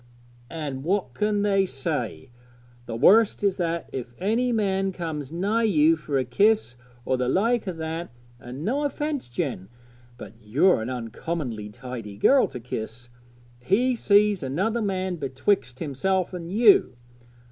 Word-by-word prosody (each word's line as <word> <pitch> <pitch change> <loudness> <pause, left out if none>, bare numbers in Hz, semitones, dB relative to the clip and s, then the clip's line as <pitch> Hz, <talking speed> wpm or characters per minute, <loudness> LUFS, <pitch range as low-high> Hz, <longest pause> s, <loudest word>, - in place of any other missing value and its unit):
'An' 145 -5 -5
what 180 -4 -1
can 210 +5 0
they 195 -1 +3
say? 135 -4 -4 0.6
the 115 - -4
worst 205 - +4
is 195 -2 +2
that 170 -2 -2
if 120 -2 -6
any 230 +6 0
man 195 -3 0
comes 160 -6 -5
nigh 200 +7 0
you 165 -7 +4
for 150 -3 -3
a 130 - 0
kiss 125 - +2 0.3
or 130 - +1
the 125 0 0
like 220 - +1
o' - - 0
that 165 0 -5 0.3
and 125 +6 -8
no 275 +6 0
offence, 290 - -3
Jen, 120 - -4 0.5
but 105 -4 -10
you're 125 - +3
an 110 - -4
uncommon 120 -2 -4
tidy 120 -4 -8
girl 270 - +4
to 125 - -8
kiss 115 0 -6 0.5
he 220 - +2
sees 205 -3 +3
another 190 - -1
man 190 -3 -2
betwixt 130 - -1
himself 180 +6 -1
an' 170 -2 -6
you. 210 - +4
165 Hz, 145 wpm, -25 LUFS, 130-205 Hz, 0.6 s, worst